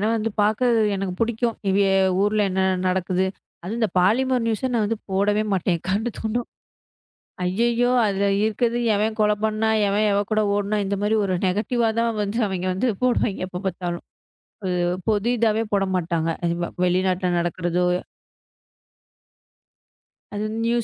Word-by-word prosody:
அந்த 225 0 -1
பாக்க 215 +4 +2 0.3
எனக்கு 190 -2 -3
பிடிக்கும் 230 0 0
இதே 195 0 +3 0.3
ஊர்ல 210 +1 +2
என்ன 190 +1 0 0.3
நடக்குது 185 0 0 0.4
அது 185 - -5
இந்த 220 - +2
பாலிமர் 245 +6 +2
நியூஸ் 225 +1 -1
ஆ - - +2
நாங்க 220 +1 0 0.2
போடவே 205 +2 +2
மாட்டேன் 175 -2 0
கரண்டு 210 +5 0
துண்டம் 230 +2 -2 1.0
அய்யய்யோ 235 +6 +1
அதுல 200 0 0 0.2
இருக்கறுது. 235 +2 0 0.2
எவன் 215 +2 0
கொலை 210 0 +3
பண்ண 215 0 0 0.2
எவன் 205 +2 +1
எவ 200 - +2
கூட 215 0 +3
ஒடுநா 205 +1 0
இந்த 200 +1 -1
மாரி 210 +2 +1
ஒரு 185 -1 0
நெகட்டிவ் 225 +5 0
த - - +3 0.2
வந்து 205 +3 -2
அவிய்ங்க 185 -1 -3
வந்து 220 +7 0 0.2
போடுவாங்க 235 -6 +1
எப்பார்த்தாலும் 180 -2 -4 0.6
அது 185 -1 -1 0.3
பொது 215 +2 +1
இதவே 220 0 +2
போடமாட்டங்க 180 -4 0 0.3
இவ 175 0 -3 0.2
வெளிநாட்டுல 185 0 +1
நாடக்குறதோ. 175 +1 -1 2.5
அதுவந்து 220 +2 -2
205 Hz, 130 wpm, -23 LUFS, 185-225 Hz, 2.5 s, இதே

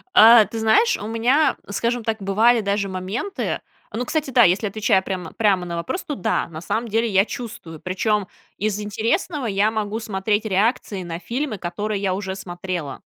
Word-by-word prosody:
А, 225 0 +9
ты 225 - -6
знаешь, 430 - +4
у 205 - -6
меня, 245 +7 +2
скажем 235 +3 -1
так, 220 -1 -2
бывали 220 +5 +3
даже 200 0 0
моменты 190 - -3 0.3
Ну, 235 +4 -3
кстати, 310 +1 -1
да, 245 -2 +5
если 190 +3 +3
я - - -3
отвечаю 195 -2 +2
прямо 185 -4 -5
прямо 200 -5 +2
на 170 - -4
вопрос, 260 - -3
то 300 -4 -4
да, 185 - 0
на 160 -1 -8
самом 230 +6 -2
деле 225 +2 +1
я 195 -2 +3
чувствую. 215 -10 -7
Причём 200 +3 0 0.3
из 210 0 -1
интересного 235 - -1
я 205 0 +2
могу 215 0 -2
смотреть 210 0 -1
реакции 200 -1 0
на 170 -1 -5
фильмы, 245 +3 -3
которые 200 +4 -3
я 190 -2 0
уже 190 -1 -4
смотрела. 175 -5 -5
210 Hz, 185 wpm, -22 LUFS, 190-230 Hz, 0.3 s, А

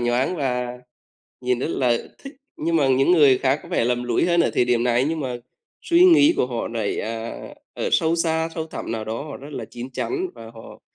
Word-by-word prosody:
nhoáng 120 +8 0
và 125 -3 -2 0.6
nhìn 125 -1 0
rất 135 - -2
là 120 -3 +1 0.2
thích, 275 +1 -10 0.2
nhưng 165 +1 0
mà 140 -4 +3
những 135 +6 +3
người 145 -6 +5
khác 135 +2 +1
có - - -13
vẻ - - +1
lầm 125 0 0
lũi 120 +7 +1
hơn 170 -1 +3
ở - - +2
thời 125 - +3
điểm 120 -1 +1
này 125 +2 +2
nhưng 160 -1 -2
mà 125 -3 -3 0.5
suy 345 +1 +4
nghĩ 330 -2 +6
của - - +1
họ 120 -2 -3
lại, 110 -3 -2
à, 115 +1 -5 0.4
ở - - -2
sâu 165 +1 +2
xa, 160 -1 0
sâu 160 -1 -4
thẳm 155 - -6
nào 110 -1 -3
đó 110 +4 -4
họ 150 - -7
rất 140 +2 -11
là - - -5
chín 120 +2 -9
chắn, 370 - -2
và 115 0 -11
họ 115 -1 -13
130 Hz, 230 wpm, -22 LUFS, 120-160 Hz, 0.6 s, nghĩ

